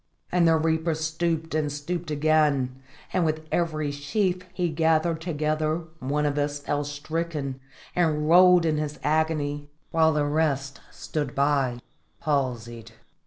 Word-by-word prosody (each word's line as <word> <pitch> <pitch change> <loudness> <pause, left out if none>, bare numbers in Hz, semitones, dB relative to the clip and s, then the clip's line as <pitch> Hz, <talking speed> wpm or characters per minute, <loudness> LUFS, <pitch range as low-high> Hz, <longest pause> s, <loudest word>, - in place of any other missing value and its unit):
And 175 -1 +4
the 165 -1 +5
reaper 160 +1 +1
stooped 160 0 -2
and 155 -2 0
stooped 155 +4 -4
again, 145 -4 +2 0.3
and 185 - +2
with 155 0 -1
every 155 -4 0
sheaf 180 +6 -1
he 180 -1 -1
gathered 160 +1 +1
together 155 0 -1 0.2
one 145 +3 -1
of 145 0 0
us 145 0 -1
fell 145 0 -2
stricken 145 -1 -4 0.4
and 155 -3 +1
rolled 180 +1 +7
in 155 -1 +1
his 150 -1 -3
agony, 150 -1 0 0.2
while 160 -1 +4
the 150 -1 +1
rest 145 -2 0
stood 145 -5 -4
by 140 -4 +1 0.4
palsied. 120 -6 -2
155 Hz, 135 wpm, -26 LUFS, 145-160 Hz, 0.4 s, rolled